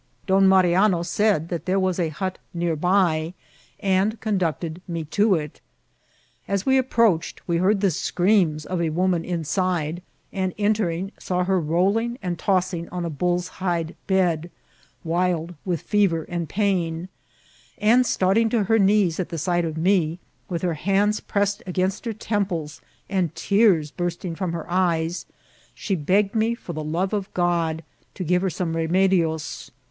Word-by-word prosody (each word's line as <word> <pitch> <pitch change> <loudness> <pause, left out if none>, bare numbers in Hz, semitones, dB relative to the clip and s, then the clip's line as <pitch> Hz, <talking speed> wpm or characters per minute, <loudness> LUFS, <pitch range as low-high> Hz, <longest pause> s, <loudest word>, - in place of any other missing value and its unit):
Don 195 0 +4
Mari 185 -2 +5
ano 185 -2 +3
said 195 -3 +1
that 170 -2 -4
there 190 +1 +2
was 185 -1 0
a 165 -2 +1
hut 185 +4 -4 0.2
near 170 -1 0
by, 175 -1 +1 0.4
and 195 +3 +1
conducted 175 -5 -2
me 170 -2 -3
to 200 +6 +2
it. 150 -3 -5 0.9
As 200 0 -1
we 265 0 +4
approached, 230 -9 +1
we 170 -1 +1
heard 195 +3 +2
the 195 -3 +3
screams 175 -2 +1
of 180 -2 -2
a 165 - +1
woman 175 +1 +1
inside, 175 -1 -1 0.3
and, 190 -2 -2
entering, 200 -3 0
saw 180 0 -1
her 190 0 +1
rolling 195 +9 +1
and 175 -3 -4
toss 185 0 +1
ing 170 -1 -5
on 175 -1 -4
a 165 - -3
bull's 175 +4 0
hide 170 -3 -1
bed, 175 -4 +1 0.5
wild 170 0 0
with 175 -5 -1
fever 195 -6 +2
and 170 -2 -4
pain; 180 -4 0 0.7
and, 230 +4 +4
starting 220 0 +2
to 225 -2 +1
her 225 +3 +2
knees 195 -4 +3
at 185 - -2
the 165 - -4
sight 175 +2 0
of 160 -1 -4
me, 170 -2 +2 0.3
with 170 -2 -3
her 175 -2 +1
hands 200 +6 +1
pressed 200 0 -1
against 185 +4 -1
her 230 - -2
temples, 190 -8 -3 0.3
and 185 -5 -1
tears 195 -8 +3
bursting 175 0 -3
from 180 0 -3
her 165 -2 -4
eyes, 175 -2 0 0.5
she 200 - -3
begged 190 +5 +1
me, 225 +1 +1
for 180 -7 -8
the 155 -1 -4
love 175 +6 -1
of 200 -2 -2
God, 170 -2 0 0.3
to 185 - -4
give 180 +1 +2
her 190 - +1
some 165 0 -3
remedies. 165 -1 0
180 Hz, 165 wpm, -23 LUFS, 165-195 Hz, 0.9 s, Mari